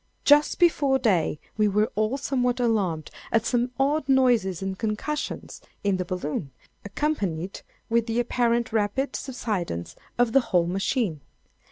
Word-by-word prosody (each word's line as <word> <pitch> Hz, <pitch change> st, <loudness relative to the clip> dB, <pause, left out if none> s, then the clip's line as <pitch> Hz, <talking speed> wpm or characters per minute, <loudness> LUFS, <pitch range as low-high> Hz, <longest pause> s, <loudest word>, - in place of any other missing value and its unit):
Just 295 Hz, +1 st, +5 dB
before 290 Hz, -6 st, +3 dB
day, 185 Hz, -, +1 dB, 0.2 s
we 215 Hz, -1 st, +3 dB
were 210 Hz, +2 st, +1 dB
all 215 Hz, +5 st, 0 dB
somewhat 250 Hz, -2 st, 0 dB
alarmed 195 Hz, -10 st, 0 dB, 0.2 s
at 225 Hz, 0 st, +2 dB
some 245 Hz, 0 st, +1 dB
odd 280 Hz, +1 st, +1 dB
noises 240 Hz, -9 st, +3 dB
and 190 Hz, 0 st, -2 dB
concussions 220 Hz, +9 st, -4 dB, 0.2 s
in 200 Hz, -2 st, +2 dB
the 185 Hz, -, -2 dB
balloon, 160 Hz, -4 st, -3 dB, 0.3 s
accompanied 195 Hz, -, -2 dB, 0.3 s
with 230 Hz, 0 st, +1 dB
the 230 Hz, +1 st, 0 dB
apparent 235 Hz, -1 st, +1 dB
rapid 225 Hz, +6 st, 0 dB
subsidence 205 Hz, -, -4 dB, 0.2 s
of 240 Hz, -1 st, +3 dB
the 270 Hz, -, +6 dB
whole 180 Hz, -7 st, +1 dB
machine. 190 Hz, -, -1 dB
225 Hz, 140 wpm, -25 LUFS, 190-255 Hz, 0.3 s, the